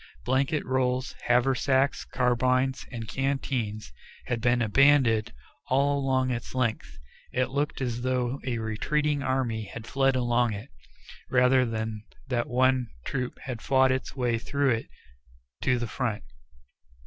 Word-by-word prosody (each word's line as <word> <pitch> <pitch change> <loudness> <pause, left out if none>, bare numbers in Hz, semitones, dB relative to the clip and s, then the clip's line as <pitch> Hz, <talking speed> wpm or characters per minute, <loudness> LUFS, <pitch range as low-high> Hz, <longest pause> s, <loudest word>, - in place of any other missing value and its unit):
Blanket 135 +4 +1
rolls, 130 0 0
haversacks, 130 +2 +2
carbines, 130 +1 +1
and 115 -3 -6
canteens 125 - -2 0.3
had 120 -1 -2
been 120 +1 +3
abandoned 120 -1 +4 0.4
all 140 +2 +2
along 130 -1 +1
its 120 +1 -5
length. 110 - -1 0.3
It 125 0 0
looked 145 +1 -1
as 120 -2 -2
though 130 +1 -1
a 125 -3 -2
retreating 145 +7 0
army 130 -5 -1
had 110 +3 -9
fled 135 +1 +2
along 120 -2 +2
it, 100 - -8 0.6
rather 125 0 +4
than 110 -1 -4 0.3
that 120 -2 -1
one 130 0 +2 0.2
troop 125 -2 -3
had 125 -4 -5
fought 130 -1 +3
its 130 0 -2
way 120 -3 0
through 140 +3 0
it 115 -1 -1 0.7
to 130 -2 +2
the 120 - -2
front. 115 -1 -3
125 Hz, 135 wpm, -27 LUFS, 120-135 Hz, 0.7 s, abandoned